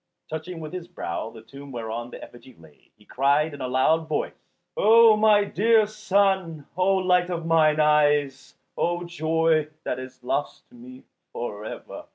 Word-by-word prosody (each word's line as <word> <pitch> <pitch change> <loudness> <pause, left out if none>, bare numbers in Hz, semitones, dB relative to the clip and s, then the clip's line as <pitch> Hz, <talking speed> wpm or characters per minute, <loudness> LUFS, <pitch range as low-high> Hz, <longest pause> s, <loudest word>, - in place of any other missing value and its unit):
Touching 160 +2 -6
with 155 +1 -8
his 180 -2 -6
brow 110 - -5
the 115 -1 -14
tomb 140 +3 -12
whereon 120 0 -5
the - - -10
effigy 120 +1 -14
lay, 80 -3 -21
he 105 - -23
cried 145 +5 +1
in 140 - -9
a 130 - -2
loud 155 +6 +1
voice, 155 - -2 0.4
"O 225 +1 +6
my 210 -1 +4
dear 220 +2 +3
son, 195 -7 0
O 185 +2 +2
light 180 -1 +2
of 170 -2 -4
mine 155 -2 +3
eyes, 150 -2 +2 0.2
O 175 0 -1
joy 160 -2 0 0.2
that 125 - -3
is 130 0 -11
lost 140 +3 -3
to - - -19
me 125 +2 -13 0.3
for 105 -3 -6
ever." - - -9
155 Hz, 170 wpm, -24 LUFS, 130-180 Hz, 0.4 s, O